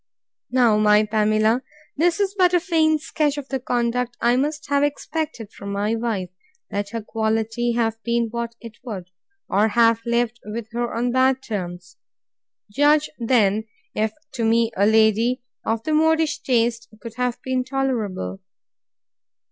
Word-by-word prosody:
Now, 240 -4 +4
my 210 0 +5
Pamela, 215 +2 +2 0.3
this 335 +4 +2
is 400 -1 +1
but 365 -3 +3
a - - +5
faint 320 -3 +2
sketch 295 -2 -1
of 280 -2 -6
the 265 - -1
conduct 245 0 -1
I 240 +1 +3
must 295 +3 -1
have 285 0 +2
expected 290 -5 -3
from 200 0 -7
my 205 +2 0
wife, 220 -6 -2 0.4
let 200 0 -2
her 230 -1 -5
quality 225 +2 -1
have 225 -1 -1
been 235 -1 0
what 235 0 -4
it 230 -1 -11
would; 190 -8 -7 0.4
or 205 +3 +3
have 230 0 +3
lived 235 0 0
with 215 +1 -6
her 240 +1 -2
on 240 +1 0
bad 260 +1 +2
terms. 180 -5 -6 0.7
Judge 295 +5 +3
then, 220 -3 +2 0.3
if 215 0 0 0.2
to 240 - -2
me 225 0 +3
a 200 +2 +3
lady 220 +3 +3 0.2
of 225 0 -1
the 310 - -1
modish 320 0 +2
taste 235 -2 0
could 230 -1 -8
have 250 -1 -1
been 260 -1 0
tolerable. 235 - -2
235 Hz, 155 wpm, -22 LUFS, 220-265 Hz, 0.7 s, my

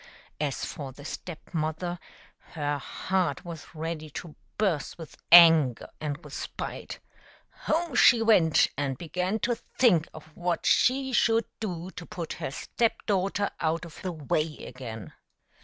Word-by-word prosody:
As 145 -3 -2
for 140 -3 -6
the 140 +2 -13
Step 175 +2 -8
mother, 165 +2 -2 0.5
her 145 -2 -1
heart 180 0 -1
was 165 -1 -9
ready 155 -1 -4
to 155 +2 -8 0.2
burst 190 -9 0
with 165 -3 -10 0.2
anger 165 -7 +8
and 145 -2 -2
with - - -11
spite. - - -6 0.7
Home 330 -1 0
she 240 -1 +7
went 200 -9 +4
and 135 -2 -2
began 180 +6 -2
to 240 - +1 0.2
think 180 -11 +4
of 155 0 -13
what 175 -1 -2
she 265 +1 +3
should 230 -2 +3
do 180 -4 -4
to 180 -3 -9
put 170 -3 -5
her - - -2
step 230 - -1
daughter 200 0 0
out 165 +2 0
of 165 - -12
the 185 - -3
way 155 0 -1
again. 115 -5 -8
165 Hz, 145 wpm, -28 LUFS, 150-190 Hz, 0.7 s, anger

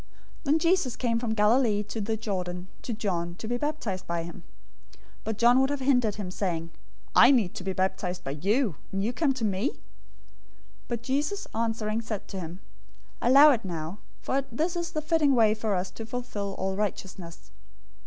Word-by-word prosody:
003:013 - - -27 0.4
Then 295 +3 +4
Jesus 330 -7 +2
came 230 -2 0
from 230 -2 -1
Galilee 210 0 +3
to 210 +2 -5
the 220 +2 -1
Jordan 180 -4 -3
to - - -5
John, 175 -6 -2
to 220 - -7
be 240 - 0
baptized 245 -10 -3
by 170 -1 -1
him. 170 +2 -9 0.8
003:014 - - -28
But 220 -1 -2
John 240 +3 +5
would 265 - +3
have 285 -1 -1
hindered 250 -6 +2
him, 200 -4 -5
saying, 170 -4 -2 0.4
"I - - +9
need 230 -10 +3
to - - -6
be 190 - -1
baptized 185 -1 -1
by 135 - -3
you, 195 - +1
and 195 0 -1
you 230 +4 0
come 290 +2 +2
to 235 -4 -1
me?" 205 +6 +1
003:015 - - -23 1.1
But 235 -1 -3
Jesus, 290 +10 -1
answering, 225 -1 -1
said 220 -3 -5
to 195 - -5
him, 175 +2 -7 0.6
"Allow 280 +5 +8
it 235 -4 0
now, 170 +1 -5 0.2
for 275 - +1
this 325 +9 -1
is 345 -1 -2
the 310 -2 -2
fitting 305 -3 +3
way 220 -3 +5
for 215 -2 -1
us 180 0 -2
to 225 - -8
fulfill 225 -5 -4
all 190 0 -1
righteousness." 185 - -5
220 Hz, 195 wpm, -28 LUFS, 190-255 Hz, 1.1 s, I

